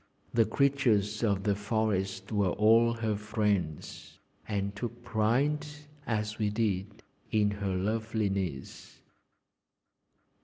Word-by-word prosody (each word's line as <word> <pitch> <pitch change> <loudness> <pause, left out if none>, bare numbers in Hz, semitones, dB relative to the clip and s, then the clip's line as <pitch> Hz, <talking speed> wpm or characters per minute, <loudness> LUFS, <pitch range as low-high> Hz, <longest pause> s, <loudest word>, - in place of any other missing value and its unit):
The 115 -1 +4
creatures 110 -5 +2
of 100 -3 +1
the 100 - +2
forest 100 -2 -1
were 100 -3 +2
all 115 +4 +4
her 110 -2 -1
friends, 105 -6 -2 0.3
and 100 -1 -2
took 120 +2 -6
pride, 125 +7 +1 0.4
as 105 -1 -2
we 105 -1 +1
did, 105 0 -2 0.3
in 105 -2 +3
her 100 -2 -2
loveliness. 100 -6 -2
105 Hz, 105 wpm, -30 LUFS, 100-115 Hz, 0.4 s, The